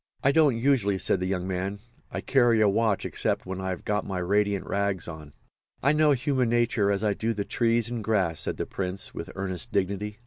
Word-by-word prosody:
"I 140 - +5
don't 145 -5 +4
usually," 115 -6 +2
said 95 - +1
the 90 - -2
young 95 -1 -2
man. 95 +2 -2 0.3
"I - - -4
carry 120 -4 +3
a 105 - +5
watch 105 0 +1
except - - -1
when 95 0 -5
I've 95 -1 -4
got 105 0 0
my 95 -2 -4
radiant 100 +2 +1
rags 100 -2 -1
on." 80 -3 -9 0.5
"I 140 - +5
know 150 -1 +4
human 130 -2 0
nature 120 -3 +2
as 100 +1 -1
I 105 -1 +2
do 115 +2 -2
the 100 -1 -2
trees 115 -1 +1
and 120 -3 -3
grass," 95 -7 +1
said - - -3
the - - -2
Prince, 95 0 -3
with 85 - -6
earnest 95 +3 -4
dignity. 100 +2 -1
100 Hz, 210 wpm, -27 LUFS, 95-115 Hz, 0.5 s, I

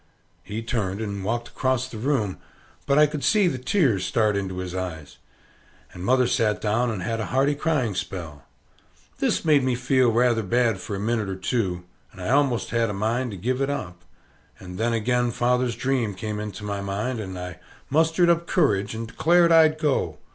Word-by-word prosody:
He 110 +2 -6
turned 105 -4 -2
and 100 -3 -4
walked 120 +3 -2
across 130 -1 0
the 115 -4 -8
room, 110 -7 -1 0.5
but 140 0 +3
I 150 - +7
could 150 -1 -4
see 210 -4 +4
the 130 -7 -2
tears 125 - +1
start 110 0 +1
into 95 -2 -3
his 90 -1 -5
eyes. 90 -5 -6 0.7
And 90 - -8
mother 130 +5 +3
sat 110 -3 +1
down 115 +3 +1
and 105 -5 -3
had 115 +2 -2
a 110 - -3
hearty 135 +3 +2
crying 145 -7 0
spell. 85 -5 -5 0.8
This - - 0
made 150 -3 +5
me 130 -1 +1
feel 125 0 +2
rather 120 0 +3
bad 115 0 +1
for 100 +2 -5
a - - -4
minit 110 -1 -1
or 95 - -3
two, 95 -2 -2 0.3
and 95 - -15
I 90 - -4
almost 135 -3 +2
had 115 -1 +1
a - - -3
mind 115 +5 -1
to 100 - -7
give 125 +8 -1
it 135 - 0
up; 90 -12 -5 0.6
and 90 0 -9
then 115 +1 +1
again 120 +2 +1
father's 125 0 +1
dream 125 -6 -1
came 105 +2 -4
into 105 0 -6
my 100 -1 -3
mind, 105 +5 -3
and 95 -3 -6
I 90 -1 -7 0.3
mustered 160 +4 +3
up 170 0 +2
courage, 105 - +1
and 115 0 -5
declared 170 +8 +3
I'd 160 -1 +6
go. 150 -3 0
115 Hz, 195 wpm, -24 LUFS, 100-130 Hz, 0.8 s, I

